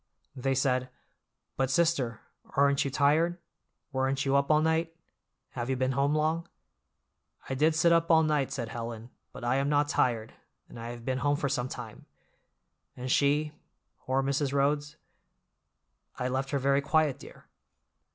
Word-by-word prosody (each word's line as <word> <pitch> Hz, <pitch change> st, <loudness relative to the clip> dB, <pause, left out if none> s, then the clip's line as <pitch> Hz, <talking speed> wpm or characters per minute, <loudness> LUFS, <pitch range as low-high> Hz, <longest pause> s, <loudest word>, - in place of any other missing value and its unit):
They 135 Hz, +1 st, -1 dB
said—But 130 Hz, 0 st, -3 dB
sister, 135 Hz, -7 st, +1 dB, 0.4 s
aren't 140 Hz, 0 st, +4 dB
you 140 Hz, -, -2 dB
tired? 155 Hz, +6 st, +2 dB, 0.5 s
Weren't 135 Hz, +1 st, 0 dB
you 135 Hz, 0 st, +2 dB
up 140 Hz, 0 st, +2 dB
all 155 Hz, 0 st, +5 dB
night? 160 Hz, +1 st, 0 dB, 0.5 s
Have 120 Hz, 0 st, -5 dB
you 130 Hz, -, +1 dB
been 130 Hz, +1 st, 0 dB
home 140 Hz, +3 st, +1 dB
long?" 160 Hz, +2 st, 0 dB, 1.0 s
"I -, -, -3 dB
did 155 Hz, +4 st, +2 dB
sit 170 Hz, +2 st, +4 dB
up 165 Hz, 0 st, +3 dB
all 160 Hz, -1 st, +6 dB
night," 150 Hz, -3 st, +1 dB
said 120 Hz, -5 st, -4 dB
Helen, 115 Hz, 0 st, -6 dB, 0.2 s
"but -, -, -10 dB
I 120 Hz, +2 st, +1 dB
am 140 Hz, +1 st, 0 dB
not 145 Hz, 0 st, +2 dB
tired, 115 Hz, -3 st, 0 dB, 0.3 s
and -, -, -11 dB
I 115 Hz, +1 st, -6 dB
have 120 Hz, -1 st, -8 dB
been 130 Hz, 0 st, -1 dB
home 145 Hz, +2 st, +2 dB
for 140 Hz, -1 st, -1 dB
some 125 Hz, -1 st, -1 dB
time." 115 Hz, -4 st, -9 dB, 0.9 s
"And 125 Hz, +1 st, -4 dB
she—poor 145 Hz, -2 st, -1 dB
Mrs. 140 Hz, 0 st, 0 dB
Rhodes?" 145 Hz, +1 st, 0 dB, 1.2 s
"I 125 Hz, 0 st, -2 dB
left 135 Hz, +1 st, -2 dB
her 140 Hz, -, 0 dB
very 140 Hz, +1 st, +2 dB
quiet, 155 Hz, -1 st, +1 dB
dear." -, -, -13 dB
140 Hz, 155 wpm, -29 LUFS, 130-150 Hz, 1.2 s, all